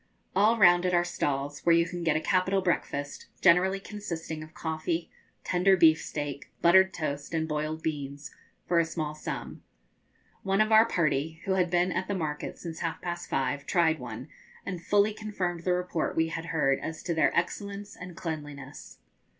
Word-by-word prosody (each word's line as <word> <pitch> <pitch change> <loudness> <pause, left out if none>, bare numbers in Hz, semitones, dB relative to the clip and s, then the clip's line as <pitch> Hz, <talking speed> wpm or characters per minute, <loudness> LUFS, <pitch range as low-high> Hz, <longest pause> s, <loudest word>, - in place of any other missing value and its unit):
All 215 +4 +4
round 175 -4 +6
it 180 -1 +2
are 175 - +4
stalls, 145 -4 -2
where 170 -1 +4
you 170 0 +4
can 175 0 -5
get 160 -2 +2
a - - -2
capital 185 +2 +1
breakfast, 145 -5 -2
generally 190 +2 +4
consisting 170 -6 -6
of 155 +1 -11
coffee, 160 +1 -3 0.3
tender 185 +2 +3
beef 160 -2 +6
steak, 145 -2 -5
buttered 190 +2 +6
toast, 145 -2 -4
and 160 0 0
boiled 155 +1 -3
beans, 145 -2 -4 0.3
for 175 -1 +3
a - - +4
small 160 -2 -3
sum. 155 - -6 0.8
One 195 +1 0
of 215 +1 +3
our 220 +1 +7
party, 160 -2 0
who 195 - -1
had 185 -2 +2
been 175 +1 +2
at 185 - -2
the 200 - -1
market 150 -4 -4
since 165 -2 -7
half 165 -1 -3
past 175 0 -5
five, 135 +2 -1
tried 165 -4 +2
one, 120 +1 -7 0.4
and 180 -3 -5
fully 205 +3 +3
confirmed 185 -6 -4
the 180 - +3
report 180 -2 -1
we 160 0 +2
had 165 0 -5
heard 150 -5 +1
as 160 0 -6
to 175 - -1
their 160 -2 +3
excellence 200 +3 -3
and 180 -2 -10
cleanliness. 145 -4 -7
170 Hz, 180 wpm, -28 LUFS, 155-185 Hz, 0.8 s, our